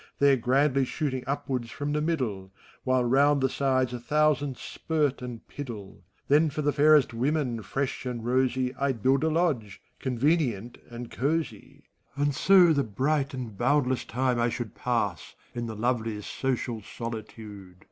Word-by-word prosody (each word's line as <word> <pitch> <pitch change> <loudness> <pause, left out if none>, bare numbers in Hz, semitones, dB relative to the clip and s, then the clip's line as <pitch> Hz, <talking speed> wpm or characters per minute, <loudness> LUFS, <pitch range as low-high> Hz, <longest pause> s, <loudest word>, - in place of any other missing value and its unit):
There 140 -1 +5
grandly 135 +3 +2
shooting 130 -1 -2
upwards 130 -3 -2
from 145 +4 -4
the 150 - 0
middle, 120 - -2 0.3
While 130 -1 +2
round 140 +4 +4
the 135 0 +1
sides 130 -2 0
a 125 - -4
thousand 145 0 +1
spirt 150 -5 -2
and 125 -2 -8
piddle. 110 -9 -8 0.3
Then 155 +3 +4
for 150 +1 -4
the 145 0 +1
fairest 150 -3 +5
women, 125 -1 -1
fresh 130 +7 -3
and 120 -2 -4
rosy, 130 0 +1
I'd 135 -5 -2
build 135 +2 +3
a 160 - +2
lodge, 155 - 0 0.2
convenient 125 - 0
and 120 0 -8
cosey; 140 -5 -3 0.3
And 145 0 +1
so 180 +2 +6
the 140 -2 +1
bright 135 +6 -1
and 120 -5 -6
boundless 130 +2 +1
time 125 0 0
I 120 0 +2
should 120 -2 -5
192 - - -25
FAUST, - - -20
Pass 100 - -1 0.2
in 120 -1 -4
the 110 - -6
loveliest 110 -2 -2
social 125 -3 -2
solitude. 105 -4 -8
130 Hz, 160 wpm, -27 LUFS, 115-145 Hz, 0.3 s, so